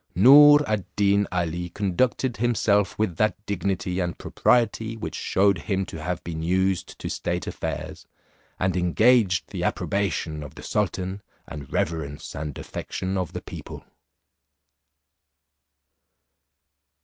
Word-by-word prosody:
Noor 145 - +8
ad 105 -3 -1
Deen 100 0 +3
Ali 85 -1 -2
conducted 115 +7 0
himself 105 -4 +1
with 105 -6 -1
that 110 -4 +2
dignity 95 -1 -2
and 85 -1 -2
propriety 115 -1 +1
which - - -5
shewed 100 -2 +2
him 95 +1 -1
to 80 - -8
have 90 +2 -3
been 80 -2 -5
used 95 +2 0
to - - -6
state - - -3
affairs, - - -5 0.5
and 90 0 0
engaged 95 +3 +3
the - - -4
approbation 85 -6 -1
of 75 -3 -9
the - - -10
sultan, 95 -1 -2 0.3
and 75 -3 -9
reverence 75 -3 -3
and 75 -1 -5
affection 95 +1 -5
of 90 -4 -2
the - - -5
people. - - -9
95 Hz, 125 wpm, -25 LUFS, 85-105 Hz, 0.5 s, Noor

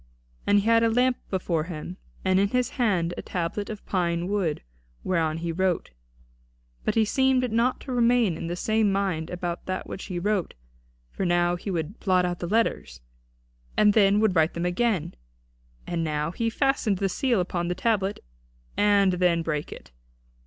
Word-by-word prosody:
And 205 0 +5
he - - -7
had 230 0 +5
a 230 - +3
lamp 250 +2 +2
before 170 -4 -1
him, 175 +1 -7 0.3
and 185 0 +3
in 200 - +3
his 250 +3 0
hand 180 -7 +1
a - - -3
tablet 180 +3 -3
of 215 -2 -7
pine 175 -2 -1
wood, 190 -6 -1 0.4
whereon 165 -3 0
he 165 0 -3
wrote. 185 +1 -1 0.9
But - - 0
he 225 -1 +4
seemed 255 +1 +2
not 235 +3 +1
to 265 - -7
remain 240 -6 +3
in 165 - -5
the 175 - -3
same 215 +2 +1
mind 190 -5 -1
about 175 -1 -4
that 185 0 -3
which 190 - -7
he 180 - -5
wrote; 195 0 -1 0.6
for - - -4
now 175 -1 +2
he 180 +3 -6
would 170 +2 -3
blot 185 -3 +2
out 175 -1 -3
the 175 - -4
letters, 195 - 0 0.8
and 210 -1 +5
then 200 -1 +4
would 215 -4 +2
write 160 -1 +2
them 170 +1 -2
again; 185 0 0 0.7
and 170 -1 -2
now 150 0 -1
he 230 +5 -1
fastened 240 -5 +1
the 195 - 0
seal 240 +3 +1
upon 175 -1 -2
the 180 - -1
tablet 205 -1 0 0.5
and 200 -2 +4
then 175 -2 +2
brake 150 -2 -3
it. - - -11
185 Hz, 180 wpm, -26 LUFS, 175-220 Hz, 0.9 s, And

